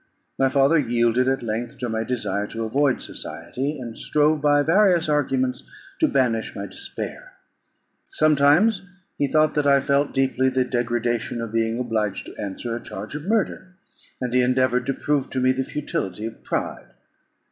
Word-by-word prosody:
My 135 0 +4
father 140 +4 +4
yielded 120 -1 +2
at 135 -1 0
length 115 +4 -4
to 125 -1 -3
my 110 -1 -1
desire 105 -4 -2
to 115 +1 -5
avoid 135 +4 +1
society, 130 - -4
and 120 -4 -7
strove 150 0 +1
by 145 -1 +4
various 175 0 +3
arguments 130 -4 0 0.3
to 315 - +4
banish 120 - 0
my 100 - -4
despair. - - -5 0.7
Sometimes 155 +7 +3 0.4
he 145 - +2
thought 155 +1 +3
that 150 -1 +1
I 140 0 +6
felt 140 +1 +1
deeply 130 -1 +1
the 130 -1 +1
degradation 120 -1 -1
of 115 -1 -5
being 115 0 0
obliged 110 -5 -2
to - - -9
answer 110 +4 -4
a 120 - -5
charge 105 +6 -7
of 150 +3 -6
murder, 195 -4 -1 0.4
and 125 -1 -3
he 125 - +4
endeavoured 125 0 +2
to 135 - +1
prove 145 -2 -1
to 130 - -2
me 130 0 +3
the 130 +1 -1
futility 110 - -4
of 115 - -8
pride. - - -3
130 Hz, 170 wpm, -23 LUFS, 115-145 Hz, 0.7 s, I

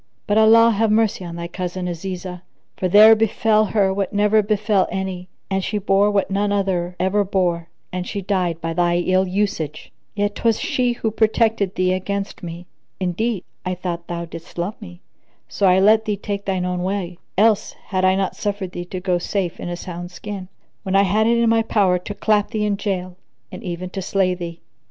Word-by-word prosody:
But 210 +1 +2
Allah 230 +1 +7
have 220 +1 +1
mercy 215 -3 +2
on 170 -1 -7
thy 170 0 -5
cousin 180 +1 -4
Azizah, 180 +1 -5 0.3
for 185 - -1
there 215 +4 +8
befel 220 0 +2
her 195 -2 +1
what 195 -1 -2
never 210 +1 +3
befel 210 -1 +1
any 185 -1 -4 0.2
and 190 -1 -1
she 210 - -2
bore 200 0 +3
what 200 -1 0
none 200 +1 +1
other 185 -3 0
ever 195 +3 +2
bore 175 -4 -1 0.2
and 180 0 -3
she 200 - -3
died 180 -4 -1
by 165 0 -3
thy 175 0 +2
ill 185 +2 +2
usage; 185 -6 -2 0.2
yet 205 0 0
'twas 225 +1 +1
she 250 -1 0
who 225 -2 -2
protected 220 -2 +1
thee 185 0 +2
against 195 +2 -3
me. 175 0 -7 0.3
Indeed, 190 +3 -1 0.2
I 185 0 -2
thought 175 -1 -5
thou 170 0 -4
didst 165 +1 -11
love 175 +5 -2
me, 180 -3 -11 0.5
so 200 - +1
I 185 0 +5
let 215 +3 +5
thee 210 -1 -1
take 200 0 -4
thine 185 -2 -1
own 180 0 -2
way; 185 -2 -3 0.2
else 215 0 +3
had 185 -2 -4
I 185 0 +4
not 195 0 -1
suffered 200 -3 -3
thee 175 0 -6
to 185 +1 -5
go 180 -1 0
safe 180 -1 -2
in - - -5
a 175 - -4
sound 175 0 -7
skin, 190 +1 -7 0.3
when 190 -1 -2
I 195 - +6
had 210 +3 +2
it 235 0 +3
in 235 0 +3
my 225 0 +4
power 195 -5 +2
to 205 +3 -7
clap 210 -1 +1
thee 215 -2 -1
in 205 -1 +1
jail 185 -3 -3 0.3
and - - -8
even 180 -1 -5
to 195 - -4
slay 185 0 +1
thee." 170 -2 -7
190 Hz, 200 wpm, -21 LUFS, 180-210 Hz, 0.5 s, there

